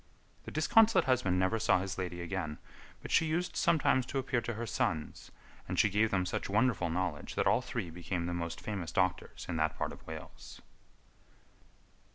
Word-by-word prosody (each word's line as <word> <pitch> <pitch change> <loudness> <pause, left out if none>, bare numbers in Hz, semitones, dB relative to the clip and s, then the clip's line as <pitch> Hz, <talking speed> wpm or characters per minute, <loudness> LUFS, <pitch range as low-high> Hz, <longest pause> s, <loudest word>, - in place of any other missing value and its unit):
The - - -7
disconsolate 225 +9 +4
husband 125 -9 +2
never 95 +5 +2
saw 110 - +4
his 95 +1 -4
lady 90 -1 -3
again, 85 -4 -3 0.5
but - - -7
she 160 - +4
used 170 +3 -1
sometimes 155 -6 +3
to 140 - -3
appear 130 -2 0
to 120 -1 -4
her 115 +2 -3
sons, 80 -8 -2 0.4
and - - -3
she 105 - +4
gave 110 +3 +3
them 95 -2 +1
such - - -3
wonderful 105 -4 +2
knowledge 85 -3 -2
that - - +1
all - - +4
three 85 - -4
became 85 +1 -3
the 85 - -2
most 85 -1 -4
famous 95 -7 -4
doctors 95 -1 -1
in 85 - -2
that 80 0 0
part - - -2
of - - -12
Wales. 80 -1 -9
95 Hz, 185 wpm, -32 LUFS, 85-120 Hz, 0.5 s, disconsolate